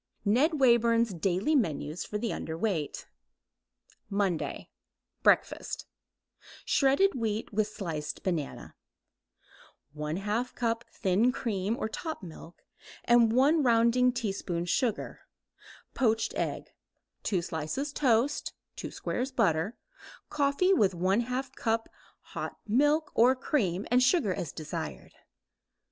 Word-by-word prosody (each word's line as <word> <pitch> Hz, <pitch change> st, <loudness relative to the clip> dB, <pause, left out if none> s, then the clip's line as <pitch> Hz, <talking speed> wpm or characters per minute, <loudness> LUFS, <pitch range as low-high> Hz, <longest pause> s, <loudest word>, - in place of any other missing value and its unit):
NED 280 Hz, +10 st, +3 dB
WAYBURN'S 235 Hz, -3 st, +4 dB
DAILY 185 Hz, -, 0 dB
MENUS 160 Hz, -, -1 dB
FOR 210 Hz, -, -3 dB
THE 225 Hz, +1 st, -2 dB
UNDERWEIGHT 160 Hz, -1 st, -3 dB, 1.0 s
MONDAY 195 Hz, -5 st, -2 dB, 0.5 s
BREAKFAST -, -, +1 dB, 0.8 s
Shredded 280 Hz, +9 st, +3 dB
wheat 220 Hz, -3 st, -3 dB
with 210 Hz, 0 st, +1 dB
sliced 165 Hz, -8 st, -5 dB
banana, 170 Hz, -7 st, -3 dB, 1.2 s
1/2 200 Hz, +11 st, -2 dB
cup 230 Hz, -1 st, -1 dB
thin 205 Hz, +5 st, +2 dB
cream 215 Hz, -3 st, -2 dB
or -, -, -2 dB
top 315 Hz, -, -5 dB
milk 170 Hz, 0 st, -11 dB, 0.4 s
and 235 Hz, -2 st, +5 dB
1 280 Hz, +7 st, +4 dB
rounding 240 Hz, 0 st, +4 dB
teaspoon 195 Hz, -7 st, -3 dB
sugar; 225 Hz, +4 st, -1 dB, 0.7 s
poached 225 Hz, -3 st, +1 dB
egg; -, -, -3 dB, 0.5 s
2 185 Hz, -5 st, 0 dB
slices 170 Hz, -, -3 dB
toast, 260 Hz, +1 st, +1 dB, 0.2 s
2 -, -, -5 dB
squares 260 Hz, +2 st, -3 dB
butter; 195 Hz, -3 st, +1 dB, 0.5 s
coffee 295 Hz, +6 st, +2 dB
with 200 Hz, -, +3 dB
1/2 240 Hz, +9 st, 0 dB
cup 225 Hz, -3 st, -1 dB, 0.5 s
hot -, -, -5 dB
milk 290 Hz, +7 st, +2 dB
or 245 Hz, +3 st, +5 dB
cream 210 Hz, -, -1 dB
and 250 Hz, +1 st, +5 dB
sugar 255 Hz, -, +3 dB
as 170 Hz, -, -4 dB
desired. 155 Hz, -2 st, -6 dB
225 Hz, 105 wpm, -29 LUFS, 185-255 Hz, 1.2 s, and